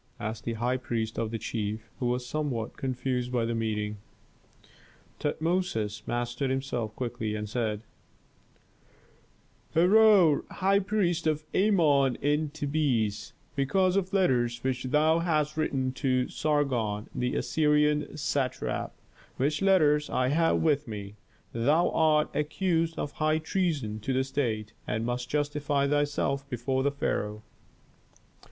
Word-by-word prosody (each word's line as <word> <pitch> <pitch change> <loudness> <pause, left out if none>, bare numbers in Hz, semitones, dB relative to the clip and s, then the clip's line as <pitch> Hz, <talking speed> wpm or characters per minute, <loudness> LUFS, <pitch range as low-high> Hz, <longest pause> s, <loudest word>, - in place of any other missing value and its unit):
asked 110 +1 -5
the 115 - -1
high 120 +3 0
priest 115 -3 -3
of 115 - -1
the 115 - -3
chief, 110 0 -4
who 125 - 0
was 125 +1 -1
somewhat 125 -5 -3
confused 125 -1 -2
by 120 -2 +1
the 115 - -1
meeting. 105 -2 -2 1.2
Tutmosis 150 - -1
mastered 120 +2 -2
himself 125 -5 -2
quickly, 115 -3 -3
and 105 0 -4
said, 110 -1 -2 1.9
"Herhor, 185 -2 +6
high 195 +1 +2
priest 185 -5 0
of 155 0 0
Amon 150 - +3
in 150 +3 0
Thebes, 140 -9 -1 0.2
because 185 +7 +2
of 190 -1 0
letters 120 - +1
which 130 -1 -1
thou 155 +5 +3
hast 155 -3 0
written 135 -4 0
to 130 -2 +2
Sargon, 125 -9 0
the 125 0 -1
Assyrian 150 -1 +1
satrap, 140 -3 -2 0.4
which 145 +5 0
letters 150 -7 +4
I 130 0 +1
have 165 +3 +2
with 150 -3 +2
me, 100 -2 -6 0.4
thou 145 +9 +2
art 155 -1 +2
accused 165 +2 0
of 145 - -3
high 155 0 +1
treason 155 - -1
to 120 +5 -2
the 130 +1 +2
state, 115 -6 -2
and 110 +2 -1
must 125 +1 -3
justify 145 -1 0
thyself 145 -1 0
before 130 +2 -1
the 140 - +2
pharaoh." 105 -6 -2
135 Hz, 130 wpm, -28 LUFS, 120-155 Hz, 1.9 s, Herhor